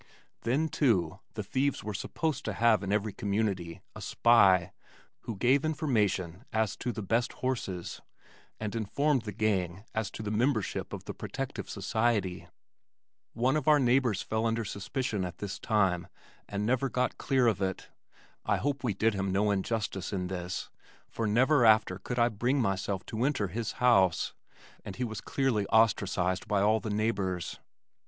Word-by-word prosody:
Then, 140 Hz, +7 st, +1 dB
too, 105 Hz, -, +1 dB, 0.2 s
the -, -, -3 dB
thieves 140 Hz, +1 st, 0 dB
were 105 Hz, -, -4 dB
supposed 150 Hz, +7 st, -2 dB
to 110 Hz, -, -2 dB
have 110 Hz, +1 st, +3 dB
in 100 Hz, 0 st, -3 dB
every 105 Hz, 0 st, 0 dB
community 100 Hz, -6 st, -2 dB
a -, -, -8 dB
spy 95 Hz, -7 st, +4 dB, 0.5 s
who 115 Hz, -, -4 dB
gave 125 Hz, +8 st, +3 dB
information 110 Hz, -, 0 dB
as 110 Hz, -2 st, 0 dB
to 125 Hz, -, -2 dB
the 110 Hz, -, -5 dB
best 115 Hz, +5 st, 0 dB
horses, 105 Hz, -9 st, -3 dB, 0.6 s
and 105 Hz, -2 st, -3 dB
informed 135 Hz, +5 st, +1 dB
the 105 Hz, -, -3 dB
gang 100 Hz, -4 st, -1 dB
as 110 Hz, -1 st, -1 dB
to 110 Hz, -, -7 dB
the 105 Hz, -, -3 dB
membership 110 Hz, 0 st, 0 dB
of -, -, -6 dB
the -, -, -5 dB
Protective -, -, -5 dB
Society. 105 Hz, -6 st, 0 dB, 0.9 s
One 125 Hz, +4 st, +1 dB
of 155 Hz, -2 st, -1 dB
our 150 Hz, -1 st, +7 dB
neighbors 125 Hz, -4 st, +2 dB
fell 110 Hz, +1 st, 0 dB
under 115 Hz, 0 st, -1 dB
suspicion 105 Hz, +1 st, -3 dB
at 90 Hz, -1 st, -5 dB
this 100 Hz, -1 st, -5 dB
time 95 Hz, -6 st, +1 dB, 0.4 s
and 100 Hz, +1 st, -2 dB
never 130 Hz, +3 st, +1 dB
got 125 Hz, +1 st, -1 dB
clear 130 Hz, -3 st, +2 dB
of 110 Hz, -5 st, +2 dB
it. 95 Hz, -1 st, -2 dB, 0.5 s
I -, -, +1 dB
hope 140 Hz, 0 st, -2 dB
we 110 Hz, -6 st, 0 dB
did 110 Hz, +2 st, +2 dB
him 95 Hz, -1 st, -1 dB
no 105 Hz, +2 st, +2 dB
injustice 100 Hz, -2 st, -2 dB
in 90 Hz, -3 st, -2 dB
this 90 Hz, -2 st, -4 dB, 0.4 s
for 115 Hz, -, -2 dB
never 125 Hz, +6 st, +4 dB
after 110 Hz, -4 st, +4 dB
could 125 Hz, -, -5 dB
I 120 Hz, 0 st, +4 dB
bring 120 Hz, +6 st, 0 dB
myself 95 Hz, -3 st, -1 dB
to 110 Hz, +2 st, -3 dB
enter 130 Hz, -8 st, +1 dB
his 110 Hz, +4 st, -3 dB
house, 100 Hz, -9 st, +3 dB, 0.5 s
and 95 Hz, -, -7 dB
he 125 Hz, -, -2 dB
was 110 Hz, -4 st, -4 dB
clearly 115 Hz, -3 st, 0 dB
ostracized 95 Hz, -4 st, +2 dB
by 105 Hz, -2 st, +2 dB
all 105 Hz, +2 st, +3 dB
the 110 Hz, -, -5 dB
neighbors. 100 Hz, -5 st, -1 dB
110 Hz, 165 wpm, -30 LUFS, 95-120 Hz, 0.9 s, our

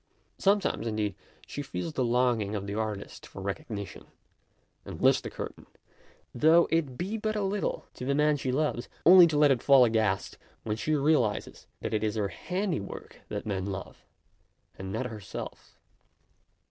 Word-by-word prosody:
Sometimes, 200 Hz, -, +1 dB
in 110 Hz, -, -2 dB
deed, 105 Hz, -2 st, -1 dB, 0.3 s
she 145 Hz, -, -5 dB
feels 155 Hz, +3 st, -5 dB
the 130 Hz, -, 0 dB
longing 120 Hz, -4 st, +1 dB
of 100 Hz, -1 st, -3 dB
the 100 Hz, -, -4 dB
artist 105 Hz, -2 st, -4 dB
for -, -, -11 dB
recognition, 100 Hz, +1 st, -6 dB, 0.8 s
and -, -, -8 dB
lifts -, -, +4 dB
the -, -, -6 dB
curtain, -, -, -8 dB, 0.7 s
though 160 Hz, +6 st, +5 dB
it 150 Hz, -6 st, 0 dB
be 200 Hz, +5 st, -2 dB
but 215 Hz, 0 st, -1 dB
a 210 Hz, -, 0 dB
little, 195 Hz, +1 st, -2 dB
to -, -, -9 dB
the 140 Hz, +1 st, +1 dB
man 150 Hz, +1 st, +3 dB
she 135 Hz, -2 st, -2 dB
loves, 135 Hz, -3 st, -1 dB, 0.2 s
only 180 Hz, 0 st, +9 dB
to 155 Hz, -2 st, -1 dB
let 145 Hz, -1 st, +6 dB
it 125 Hz, -4 st, +2 dB
fall 135 Hz, -3 st, +7 dB
aghast, 110 Hz, -4 st, 0 dB, 0.2 s
when 105 Hz, -1 st, -2 dB
she 155 Hz, +8 st, 0 dB
realizes 140 Hz, -7 st, 0 dB
that -, -, -3 dB
it 110 Hz, -, 0 dB
is 110 Hz, 0 st, 0 dB
her 105 Hz, -2 st, 0 dB
handiwork 180 Hz, -, -4 dB
that -, -, -4 dB
men 100 Hz, -2 st, -2 dB
love, 95 Hz, -1 st, -7 dB, 0.7 s
and 95 Hz, 0 st, -7 dB
not 115 Hz, +5 st, -2 dB
her 110 Hz, -3 st, -6 dB
self. -, -, -8 dB
125 Hz, 170 wpm, -29 LUFS, 105-155 Hz, 0.8 s, only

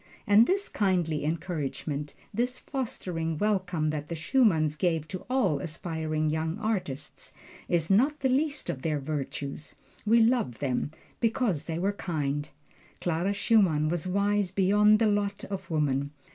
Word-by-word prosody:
And 205 Hz, +3 st, +6 dB
this 395 Hz, +2 st, +1 dB
kindly 175 Hz, -7 st, 0 dB
encouragement, 150 Hz, -2 st, -3 dB, 0.2 s
this 250 Hz, +2 st, 0 dB
fostering 180 Hz, -, -3 dB
welcome 180 Hz, -6 st, 0 dB
that 150 Hz, -1 st, -4 dB
the 170 Hz, -, -4 dB
Schumanns 160 Hz, -, +2 dB
gave 165 Hz, -2 st, 0 dB
to 185 Hz, -, -7 dB
all 195 Hz, -, +2 dB
aspiring 155 Hz, -1 st, -2 dB
young 160 Hz, +3 st, -1 dB
artists, 185 Hz, -10 st, -3 dB, 0.4 s
is 170 Hz, 0 st, +1 dB
not 275 Hz, +9 st, +3 dB
the 265 Hz, -, +3 dB
least 285 Hz, +2 st, 0 dB
of 130 Hz, -, -3 dB
their 155 Hz, -1 st, 0 dB
virtues. 140 Hz, 0 st, -5 dB, 0.3 s
We 225 Hz, +2 st, +4 dB
love 225 Hz, -, +2 dB
them 130 Hz, -1 st, -1 dB, 0.3 s
because 225 Hz, -, +1 dB
they 165 Hz, -1 st, -3 dB
were 195 Hz, +4 st, 0 dB
kind. 145 Hz, -6 st, -2 dB, 0.5 s
Clara 175 Hz, +3 st, 0 dB
Schumann 190 Hz, -8 st, +3 dB
was 175 Hz, +1 st, -1 dB
wise 200 Hz, +1 st, +1 dB
beyond 205 Hz, +3 st, +4 dB
the 225 Hz, -, +2 dB
lot 205 Hz, -1 st, 0 dB
of 195 Hz, -, -5 dB
woman. 140 Hz, -3 st, 0 dB
175 Hz, 145 wpm, -28 LUFS, 155-210 Hz, 0.5 s, And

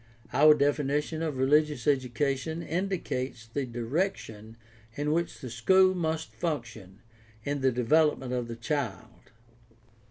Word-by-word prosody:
Our 150 Hz, +1 st, +7 dB
definition 145 Hz, +2 st, 0 dB
of 155 Hz, -5 st, -2 dB
religious 150 Hz, 0 st, +2 dB
education 140 Hz, +4 st, 0 dB
indicates 165 Hz, -, -3 dB
the 130 Hz, +4 st, -4 dB
direction 115 Hz, -, -3 dB, 0.4 s
in 145 Hz, +1 st, -1 dB
which 170 Hz, +2 st, -1 dB
the 130 Hz, -, -6 dB
school 185 Hz, +11 st, +4 dB
must 160 Hz, -3 st, -2 dB
function 115 Hz, -, -5 dB, 0.4 s
in 145 Hz, +1 st, -2 dB
the 130 Hz, 0 st, +3 dB
development 130 Hz, +1 st, +2 dB
of 125 Hz, -2 st, -2 dB
the 115 Hz, -, -6 dB
child. 125 Hz, +2 st, -4 dB
145 Hz, 120 wpm, -28 LUFS, 120-160 Hz, 0.4 s, Our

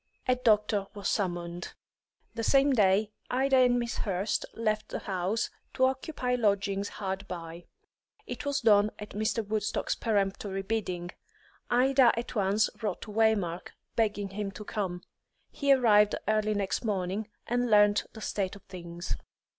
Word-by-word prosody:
A 255 Hz, -, +5 dB
doctor 210 Hz, -4 st, +2 dB
was 200 Hz, -1 st, -3 dB
summoned. 175 Hz, -3 st, -2 dB, 0.6 s
The 230 Hz, -, -4 dB
same 275 Hz, +3 st, +4 dB
day 205 Hz, -1 st, +3 dB, 0.2 s
Ida 265 Hz, +1 st, +3 dB
and 250 Hz, -1 st, +5 dB
Miss 235 Hz, -1 st, -2 dB
Hurst 195 Hz, +1 st, -1 dB
left 215 Hz, -1 st, -1 dB
the -, -, -3 dB
house, 190 Hz, +3 st, -2 dB, 0.2 s
to 260 Hz, -, +4 dB
occupy 260 Hz, -1 st, -1 dB
lodgings 200 Hz, -3 st, +1 dB
hard 195 Hz, 0 st, -4 dB
by; 170 Hz, -1 st, -7 dB, 0.6 s
it -, -, -6 dB
was 285 Hz, -1 st, -1 dB
done 210 Hz, -2 st, +5 dB
at 210 Hz, -, -8 dB
Mr. 215 Hz, +1 st, -1 dB
Woodstock's 215 Hz, 0 st, -1 dB
peremptory 195 Hz, -2 st, -1 dB
bidding. 185 Hz, -5 st, -3 dB, 0.6 s
Ida 255 Hz, 0 st, +5 dB
at 235 Hz, -, -4 dB
once 205 Hz, 0 st, +2 dB
wrote 215 Hz, -, -2 dB
to 215 Hz, -, -9 dB
Waymark, 205 Hz, -6 st, +1 dB, 0.2 s
begging 205 Hz, -3 st, 0 dB
him 200 Hz, +1 st, -4 dB
to 210 Hz, -, -9 dB
come; 185 Hz, -5 st, -3 dB, 0.5 s
he 280 Hz, -1 st, +1 dB
arrived 210 Hz, -6 st, +5 dB
early 215 Hz, 0 st, +2 dB
next 200 Hz, +2 st, -1 dB
morning, 200 Hz, 0 st, -2 dB, 0.2 s
and 245 Hz, 0 st, 0 dB
learnt 205 Hz, -1 st, +5 dB
the 220 Hz, -, -10 dB
state 195 Hz, -3 st, -2 dB
of 200 Hz, -, -14 dB
things. 175 Hz, -1 st, -6 dB
210 Hz, 145 wpm, -29 LUFS, 195-230 Hz, 0.6 s, A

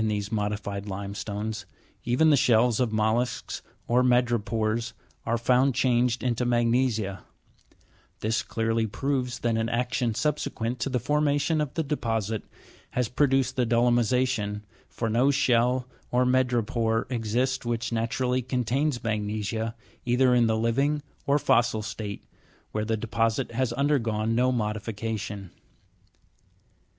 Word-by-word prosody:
these 105 Hz, -1 st, -2 dB
modified 105 Hz, -1 st, -2 dB
limestones, 100 Hz, +2 st, -4 dB, 0.4 s
even 130 Hz, +7 st, +3 dB
the -, -, +6 dB
shells 120 Hz, -4 st, +3 dB
of 125 Hz, -2 st, +2 dB
rnollusks 110 Hz, +3 st, -1 dB, 0.3 s
or 120 Hz, +1 st, +3 dB
madrepores, 115 Hz, -2 st, +1 dB, 0.3 s
are 115 Hz, 0 st, +2 dB
found 125 Hz, +2 st, +3 dB
changed 125 Hz, -2 st, +2 dB
into 125 Hz, -1 st, 0 dB
magnesia; 120 Hz, -4 st, +1 dB, 1.0 s
this 110 Hz, +1 st, +1 dB
clearly 115 Hz, 0 st, -1 dB
proves 130 Hz, +1 st, -2 dB
that 115 Hz, -1 st, +1 dB
an 115 Hz, 0 st, 0 dB
action 120 Hz, -1 st, 0 dB
subsequent 125 Hz, -4 st, -1 dB
to 110 Hz, -, -1 dB
the 130 Hz, -, 0 dB
formation 145 Hz, +3 st, +1 dB
of 150 Hz, -, -2 dB
the 165 Hz, -, 0 dB
deposit 115 Hz, -7 st, -1 dB, 0.5 s
has 125 Hz, -2 st, 0 dB
produced 135 Hz, -1 st, +1 dB
dolomisa'tion, 120 Hz, -2 st, +1 dB, 0.3 s
for 115 Hz, -, -3 dB
no 120 Hz, +5 st, +3 dB
shell 125 Hz, -1 st, +2 dB, 0.2 s
or 125 Hz, +1 st, +2 dB
madrepore 120 Hz, -3 st, +1 dB
exists 125 Hz, +3 st, 0 dB
which 120 Hz, 0 st, -2 dB
naturally 125 Hz, +3 st, 0 dB
contains 125 Hz, +2 st, -1 dB
magnesia, 110 Hz, +1 st, -2 dB, 0.3 s
either 125 Hz, +1 st, +3 dB
in 120 Hz, -2 st, +4 dB
the 110 Hz, 0 st, +1 dB
living 135 Hz, +6 st, +1 dB, 0.2 s
or 140 Hz, +1 st, +4 dB
fossil 115 Hz, -5 st, +2 dB
state, 105 Hz, -1 st, -6 dB, 0.5 s
where 105 Hz, 0 st, -2 dB
the 110 Hz, 0 st, 0 dB
deposit 115 Hz, +1 st, 0 dB
has 125 Hz, +1 st, 0 dB
undergone 115 Hz, -5 st, +1 dB
no 125 Hz, +2 st, +3 dB
modification. 105 Hz, -3 st, -3 dB
120 Hz, 120 wpm, -27 LUFS, 110-125 Hz, 1.0 s, the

